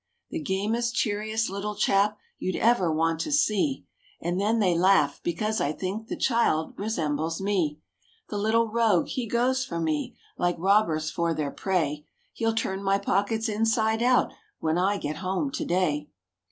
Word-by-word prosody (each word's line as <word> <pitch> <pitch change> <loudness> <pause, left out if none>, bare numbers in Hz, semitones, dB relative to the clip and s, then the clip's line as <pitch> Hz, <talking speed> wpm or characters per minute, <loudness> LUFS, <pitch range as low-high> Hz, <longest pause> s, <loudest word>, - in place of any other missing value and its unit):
The 330 - -2
gamest, 230 +2 -1
cheeriest 215 +1 0
little 200 +2 -4
chap, 200 +1 +2 0.2
you'd 185 - -2
ever 220 -8 +3
want 165 +1 +1
to 300 - -2
see! 275 -1 +1 0.3
And 175 +3 -1
then 220 +3 +2
they 185 -6 +2
laugh, 170 -5 +3
because 215 +6 -1
I 145 - +1
think 200 +6 -4
the - - -3
child 230 -10 +1
resembles 160 -6 -2
me. 185 -7 0 0.5
The 205 - -3
little 225 +2 +2
rogue! 220 -5 +2
he 250 -3 -3
goes 255 +4 +1
for 170 -9 -4
me, 155 -2 -2 0.2
like 175 0 +1
robbers 165 -4 +2
for 170 -1 0
their 150 -2 -2
prey; 155 -6 -1 0.3
He'll 225 -1 0
turn 195 -3 -1
my 195 0 +2
pockets 205 +3 0
inside 220 +1 +1
out, 250 +1 +3 0.3
when 160 +2 0
I 200 +3 +2
get 150 -4 -4
home 190 - -2
to - - -3
day. 155 -5 0
195 Hz, 165 wpm, -26 LUFS, 170-225 Hz, 0.5 s, ever